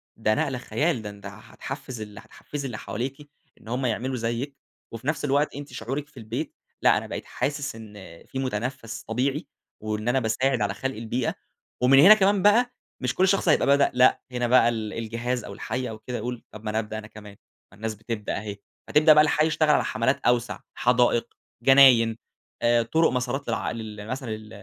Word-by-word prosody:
ده 110 -1 +1
نقلة 140 -5 -1
خيال، 145 +1 -1
ده 105 - -6
أنت 100 0 -12
هتحفِّز 125 +5 -8
ال 105 0 -8
هتحفِّزي 140 +5 -8
اللي 120 -5 -4
حواليكِ 135 +7 -5 0.3
إن - - -17
هم 125 +3 -2
يعملوا 125 +3 -1
زيِّك 120 +4 -3 0.4
وفي 115 +4 -8
نفس 155 -1 0
الوقت 145 +1 +1
أنتِ 145 0 -8
شعورِك 140 +4 -4
في 145 -3 -23
البيت، 115 +7 -5 0.3
لأ - - +5
أنا - - -4
بقيت - - -6
حاسس 145 -3 -3
إن 110 -2 -11 0.3
في 135 - -6
متنفَّس 120 -1 -3
طبيعي، 135 +7 -1 0.3
وإن 110 +1 -4
أنا 130 +2 +3
باساعد 125 +3 0
على - - 0
خلق 135 -2 -4
البيئة، 115 +2 -2 0.5
ومن 135 +2 +6
هنا 195 +8 +10
كمان 200 -2 +3
بقى 240 +5 +4 0.3
مش 130 +2 -2
كل 190 - +3
شخص 190 -2 +2
هيبقى 150 - +4
بدأ، 140 0 +4
لأ، 125 0 +4
هنا 125 -1 -1
بقى 120 -1 +5
ال 110 -2 -3
الجهاز 115 +2 -3
أو 100 - -8
الحي 125 +4 -4
أو 110 -1 -8
كده 120 +2 -5
هيقول 120 +2 -5
طب 110 - -11
ما 105 - -3
أنا 110 +1 0
أبدأ 110 0 -5
أنا 105 -1 -8
كمان، 105 -2 -13 0.3
ما - - -17
الناس 110 0 -4
بتبدأ 110 0 -4
أهي، 105 -1 -6 0.3
فتبدأ 155 +1 +6
بقى 150 0 +7
الحي 155 0 +2
يشتغل 155 -1 +1
على - - +4
حملات 115 +5 0
أوسع 120 -1 +1 0.2
حدائق، 125 -1 +2 0.3
جناين، 125 -4 +6 0.4
آآ، 120 0 +3
طرُق 160 +5 +2
مسارات 125 +2 -2
للع 110 - -1
لل 110 -2 -7
مثلًا 130 -1 -4
لل 110 0 -6
125 Hz, 195 wpm, -25 LUFS, 110-140 Hz, 0.5 s, هنا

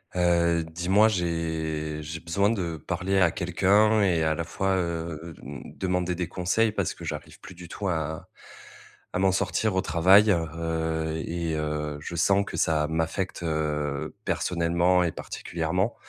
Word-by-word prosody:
Heu, 85 -1 +3
dis-moi, 90 +6 +3
j'ai 80 -5 -2
j'ai 80 +2 -6
besoin 100 +5 +1
de 90 -7 -2
parler 95 +5 -1
à 90 -3 +5
quelqu'un 100 +5 +3
et 90 -5 +2
à 80 0 +2
la 80 - -2
fois, 95 +3 -1
hem, 80 -5 -4 0.2
demander 90 -1 0
des 90 -1 -2
conseils 100 +5 +1
parce - - -2
que - - -9
j'arrive - - -6
plus - - -11
du 90 0 -11
tout 100 +4 -5
à 80 -2 -3 0.9
à - - -1
m'en 95 0 +4
sortir 100 +2 0
au 95 - +3
travail, 95 +7 +5
heu 80 -1 -1 0.2
et 85 -1 -2
heu, 75 -1 -2
je 85 - -6
sens 95 +4 +3
que - - -6
ça 75 -2 +2
m'affecte, 80 +4 -2
heu, 75 -3 -2
personnellement 85 +1 +2
et 85 - 0
particulièrement 90 +9 -2
85 Hz, 155 wpm, -26 LUFS, 80-95 Hz, 0.9 s, à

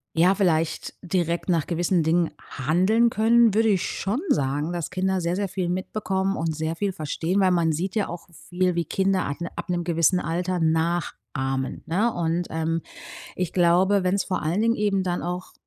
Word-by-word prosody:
ja, 175 +4 +5
vielleicht 165 -5 0
direkt 175 0 -1
nach 165 -4 +1
gewissen 175 +1 +1
Dingen 165 +1 +1
handeln 185 - +2
können, 225 0 +4
würde 225 +1 +3
ich 190 -3 +2
schon 215 - -2
sagen, 145 +4 0
dass 170 -3 -3
Kinder 185 0 0
sehr, 170 +1 -1
sehr 200 0 -1
viel 180 -1 -3
mitbekommen 190 +1 -1
und 160 -1 -2
sehr 160 +1 -2
viel 200 +2 -1
verstehen, 165 +5 -2
weil 185 -1 +4
man 170 -2 +2
sieht 185 +7 -3
ja 210 - +1
auch 175 +1 -8
viel, 180 +2 -1
wie 170 -1 -1
Kinder 190 +2 +1
ab 145 - -4
'n 170 - -3
ab - - -6
'nem 175 -1 0
gewissen 170 +1 +2
Alter 175 +3 -2
nachahmen, 160 -5 -1
ne, 210 +8 +1
und 170 +1 -1
ähm, 160 +1 -1 0.5
ich 180 -2 -2
glaube, 185 +3 +3
wenn 180 +1 +1
es 200 - 0
vor 185 - -3
allen 170 +7 0
Dingen 230 +1 +2
eben 205 -2 +1
dann 175 -1 -2
auch 180 +1 -5
175 Hz, 190 wpm, -24 LUFS, 165-190 Hz, 0.5 s, ja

